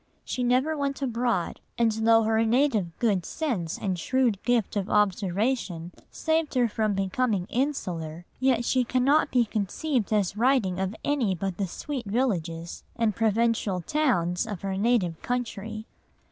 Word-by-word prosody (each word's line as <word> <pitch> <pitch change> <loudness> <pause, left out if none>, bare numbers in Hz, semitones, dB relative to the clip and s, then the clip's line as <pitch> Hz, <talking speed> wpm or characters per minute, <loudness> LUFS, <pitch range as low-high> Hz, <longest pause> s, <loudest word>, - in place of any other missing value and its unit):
She 255 - -3
never 255 +6 +2
went 280 -2 -2
abroad, 235 -7 -1 0.2
and 230 -1 +3
though 225 +1 +4
her 220 +1 +2
native 225 - +1
good 205 -7 +1
sense 215 - -2
and 185 -3 -2
shrewd 245 0 +1
gift 240 -4 +1
of 200 0 -1
observation 195 -2 0 0.2
saved 320 -2 -1
her 245 -2 +4
from 215 -2 0
becoming 195 0 0
insular, 175 - -2
yet 255 -2 +2
she 255 +1 +2
cannot 265 +5 +2
be 245 -2 +3
conceived 225 +4 -1
as 205 -2 +1
writing 220 -6 +2
of 190 +2 -2
any 255 -10 +1
but 185 0 -3
the 195 - -1
sweet 255 - -5
villages 175 -8 -2
and 225 -2 +1
the - - -23
provincial 225 -4 +1
towns 180 - +1
of 205 -5 -6
her 195 -1 -2
native 200 -5 +1
country. 220 -3 -4
220 Hz, 150 wpm, -27 LUFS, 190-250 Hz, 0.2 s, though